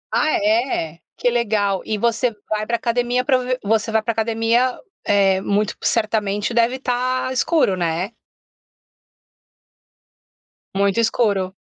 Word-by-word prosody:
Ah 310 - +2
é? 210 - 0 0.2
Que 245 - +1
legal. 210 -5 0
E 215 - -2
você 235 +3 +1 0.2
vai 215 0 -2
pra 235 - 0
academia 245 +2 0
pra 265 -3 +3
ve 250 0 -2
você 220 +2 +1
vai 220 - +3
para 230 - 0
academia, 230 +3 +1 0.3
eh, 195 -2 +3
muito 205 +1 0
certamente 215 -1 0
deve 235 +2 +2
ta 255 0 -1
escuro, 260 - +2
né? 175 +4 -2 2.6
Muito 200 +2 +1
escuro. 205 -5 +1
225 Hz, 125 wpm, -20 LUFS, 200-245 Hz, 2.6 s, pra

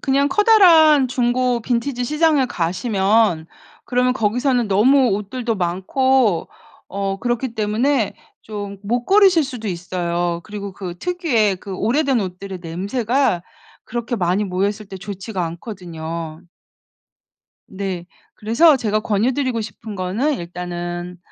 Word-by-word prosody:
그냥 280 +1 +2
커다란 330 - +6
중고 245 0 +1
빈티지 245 +2 -1
시장에 300 -1 +2
가시면 190 -1 +1 0.4
그러면 250 +1 +1
거기서는 245 +1 +1
너무 250 +6 +4
옷들도 225 +4 -2
많고 195 +4 +1 0.4
어 195 0 -3
그렇기 240 +1 -2
때문에 220 +3 0 0.3
좀 205 -2 -7
못 240 +4 -1
고르실 385 -6 +5
수도 245 -6 -6
있어요. 175 -1 -2
그리고 200 -2 -7
그 180 -3 -7
특유의 265 - +1
그 195 +1 -8
오래된 265 +3 +1
옷들의 185 0 -6
냄새가 200 +4 0 0.4
그렇게 240 +1 -3
많이 185 +2 +1
모여 190 +1 0
있을 210 0 -6
때 190 - -8
좋지가 195 -1 -5
않거든요. 165 -3 -6 1.3
네. 190 -3 -5 0.3
그래서 265 +8 +4
제가 215 -3 0
권유드리고 235 +3 0
싶은 215 0 -8
거는 205 +11 -1
일단은 175 0 -6
215 Hz, 280 characters per minute, -20 LUFS, 185-255 Hz, 1.3 s, 커다란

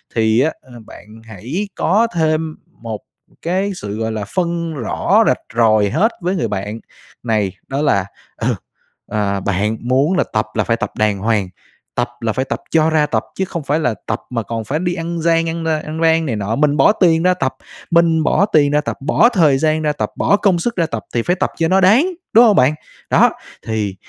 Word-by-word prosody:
Thì 110 0 +3
á, 155 +4 +2
a, 130 - -20
bạn - - -13 0.2
hãy 120 - -5
có 210 +7 +2
thêm 155 -1 0 0.2
một 110 -2 -7 0.4
cái 190 +4 -1
sự, 105 - -6
gọi 110 0 -2
là, 105 -2 -4
phân 170 -2 -1
rõ 125 -7 +1
rạch - - +2 0.2
ròi 110 -3 +4
hết 205 - +2
với 180 +2 -1
người 170 - -1
bạn 105 +2 -4 0.4
này, 110 -5 0 0.2
đó 135 +2 -2
là, 100 -11 +2 0.3
ừ, - - 0 0.5
ờ, 100 -2 -1
"Bạn 105 +3 -1
muốn 135 +9 +1
là - - +3
tập 105 0 +1
là 105 - +1
phải 115 +2 0
tập - - -3
đàng 105 -2 +1
hoàng, 105 -3 0 0.5
tập 120 - 0
là 115 -2 -1
phải 130 +3 -1
tập - - -3
cho 160 -1 +3
ra 155 -2 +2
tập 115 -7 -1
chứ 190 - -1
không 170 -3 -5
phải 145 +3 0
là 125 -8 0
tập 105 - -1
mà 115 -3 -2
còn 115 +1 -4
phải 140 +8 -2
đi 175 0 -1
ăn 170 0 -4
gian 165 0 +2
ăn, 165 0 -4
ơ, 160 -1 +1
ăn 155 +1 -6
rang 165 0 +3
này 125 -7 -2
nọ, 105 +2 -2
mình 145 +1 +2
bỏ - - +6
tiền 165 -5 +3
ra 185 0 +4
tập, 135 -7 -2 0.4
mình 165 -1 +3
bỏ 195 - +3
tiền 150 -8 +3
ra 150 0 +2
tập, - - -4
bỏ 155 - +4
thời 160 - +3
gian 155 +2 +1
ra 150 -1 0
tập, - - -3
bỏ 205 - +2
công 190 -5 +2
sức 235 +7 -2
ra 170 - +1
tập 115 -8 -5
thì 120 - +2
phải 180 - +1
tập - - -1
cho 165 - +1
nó 190 +2 +3
đáng.", 215 - +5 0.3
đúng 235 +2 +8
hông 215 -3 +5
bạn? 130 0 +4 0.4
Đó, - - +5 0.4
thì 105 -3 -2
150 Hz, 220 wpm, -18 LUFS, 110-170 Hz, 0.5 s, đúng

